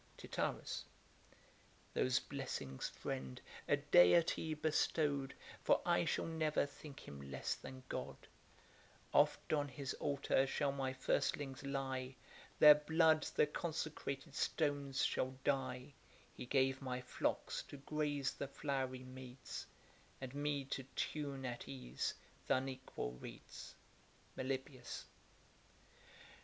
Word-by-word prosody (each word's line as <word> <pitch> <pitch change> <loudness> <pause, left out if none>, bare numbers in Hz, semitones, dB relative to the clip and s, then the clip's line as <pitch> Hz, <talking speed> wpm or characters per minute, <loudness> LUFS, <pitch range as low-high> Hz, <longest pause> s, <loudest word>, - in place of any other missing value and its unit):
TITYRUS. - - -2 1.1
Those 130 0 +3
blessings, 130 - -4
friend, 65 -1 -4 0.3
a - - +5
deity 155 - +5
bestow'd, 150 -2 +1 0.3
For - - +5
I - - +4
shall - - +1
never 160 -3 +1
think 145 0 -10
him 70 -1 -8
less 65 - -1
than 130 0 -9
God; - - -3 1.0
Oft - - +4
on 145 -1 +2
his 135 0 -4
altar 140 -1 +2
shall 140 +1 +1
my 135 -1 -1
firstlings 135 +1 0
lie, 135 -2 -2 0.4
Their 150 0 +12
blood 160 +1 +4
the - - +6
consecrated 150 -2 -3
stones 145 -3 +1
shall 130 0 0
dye: 130 0 0 0.4
He - - -7
gave 135 0 +3
my 125 -1 -2
flocks 125 - -1
to 145 - -8
graze 145 -1 0
the 140 - -4
flowery 135 -2 -2
meads, 130 0 -7 0.5
And 130 -1 -6
me 145 -1 0
to 135 - -2
tune 140 -3 -2
at 120 - -4
ease 65 -2 -3 0.3
th' - - +5
unequal 130 - -2
reeds. - - -9 0.6
MELIBOEUS. 130 0 -3
135 Hz, 115 wpm, -39 LUFS, 130-145 Hz, 1.1 s, Their